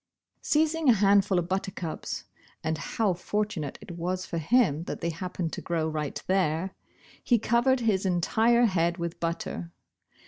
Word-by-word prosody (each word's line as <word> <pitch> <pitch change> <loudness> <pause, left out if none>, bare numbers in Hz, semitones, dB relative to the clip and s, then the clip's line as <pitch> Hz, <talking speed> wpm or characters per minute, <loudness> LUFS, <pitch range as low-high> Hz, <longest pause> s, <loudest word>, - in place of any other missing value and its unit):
Seizing 315 -1 +2
a - - +8
handful 200 -2 +4
of 175 -1 0
buttercups 185 -3 -3 0.4
(and 160 0 0
how 200 +6 0
fortunate 180 -4 -3
it - - -10
was 180 +2 -3
for 170 - -3
him 170 - +2
that - - -5
they 170 - -1
happened 175 0 -4
to - - -4
grow 165 -2 -1
right 155 -2 -3
there) 185 -1 +1 0.5
he 240 - +4
covered 240 +4 +2
his 210 -5 +2
entire 220 +6 +3
head 170 -4 +1
with 170 -1 -4
butter. 170 0 -3
185 Hz, 150 wpm, -28 LUFS, 170-215 Hz, 0.5 s, a